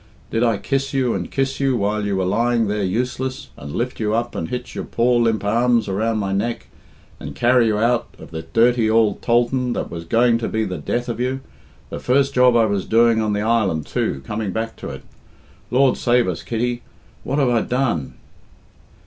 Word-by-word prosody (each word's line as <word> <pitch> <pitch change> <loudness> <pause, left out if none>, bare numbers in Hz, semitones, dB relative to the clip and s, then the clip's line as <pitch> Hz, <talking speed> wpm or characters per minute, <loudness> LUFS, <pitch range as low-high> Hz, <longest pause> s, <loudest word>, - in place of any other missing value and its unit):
Did 115 - 0
I 115 -3 +2
kiss 135 +7 -2
you 130 -3 +1
and - - -3
kiss 135 0 -1
you 135 -2 +1
while 105 0 -1
you 100 - 0
were 95 - 0
lying 115 +4 +1
there 105 +1 -1
useless, 125 +6 -2
and 70 +1 -9
lift 120 +9 -3
you 110 -1 0
up 120 +1 -1
and 80 - -4
hitch 125 0 -5
your - - -4
poor 120 +1 +1
limp 115 -2 +1
arms 120 +2 +2
around 110 +3 0
my 100 -2 -1
neck, 115 +4 -2 0.5
and - - -8
carry 120 -1 +3
you 105 -1 +1
out 115 +2 +1
of - - -13
the 80 0 -5
dirty 115 +3 +2
ould 110 -2 +2
tholthan 120 +1 +1
that - - -4
was 85 0 -6
going 115 +5 +3
to 115 - -2
be 110 0 -1
the 90 -4 -4
death 120 - -2
of 120 -1 -4
you 130 +2 -1 0.5
the - - -4
first 135 +2 +2
job 125 -1 +5
I 115 -1 +5
was 100 -3 -1
doing 115 0 +4
on 105 -1 0
the 105 - -1
island, 105 -8 +1
too, 65 - -2
coming 105 -2 -3
back 115 +3 -3
to - - -7
it.... - - -8 0.7
Lord 130 0 +3
save 120 -2 +2
us, 85 -4 -3
Kitty, 120 +6 -2 0.4
what 135 - -2
have 135 -4 +3
I 120 -2 +2
done?" 120 - -1
115 Hz, 210 wpm, -21 LUFS, 105-125 Hz, 0.7 s, job